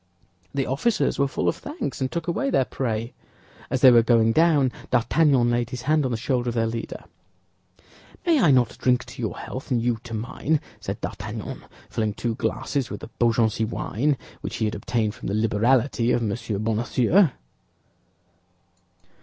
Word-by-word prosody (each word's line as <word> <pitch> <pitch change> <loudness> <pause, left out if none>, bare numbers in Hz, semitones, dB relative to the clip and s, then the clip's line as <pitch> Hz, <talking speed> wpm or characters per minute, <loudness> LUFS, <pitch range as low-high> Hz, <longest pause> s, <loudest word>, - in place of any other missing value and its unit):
The 135 -1 -1
officers 140 - 0
were 140 - +3
full 135 - -2
of - - +1
thanks, 295 - -5
and 130 - -1
took 170 0 -3
away 270 +11 0
their 135 - +2
prey. 115 -3 -3 0.6
As 130 0 -1
they 130 - +9
were 120 -1 +7
going 115 -1 +4
down 150 -2 +4 0.2
D'Artagnan 125 0 +3
laid 120 -1 0
his 125 0 -6
hand 150 0 +2
on - - 0
the 120 - -1
shoulder 125 0 -1
of 120 - -4
their 115 -1 +2
leader. 115 0 -5 1.2
"May 330 -4 +4
I 170 - +5
not 125 -3 +3
drink 125 -1 +2
to - - -9
your 110 - -3
health, 130 +3 -7
and 125 -3 +2
you 115 -1 0
to 115 -2 -5
mine?" 125 +7 -1 0.2
said - - -5
D'Artagnan, - - -6 0.2
filling 110 -2 -2
two 120 +1 -2
glasses 135 +2 -2
with 105 - -6
the 115 - -9
Beaugency 115 -1 +2
wine 125 +5 -1 0.2
which - - -5
he 110 - 0
had 105 - -1
obtained 110 0 -1
from - - -8
the 100 - -1
liberality 115 +3 +2
of 120 - +1
M. 105 -2 -1 0.3
Bonacieux. 120 - +3
120 Hz, 175 wpm, -24 LUFS, 115-135 Hz, 1.2 s, they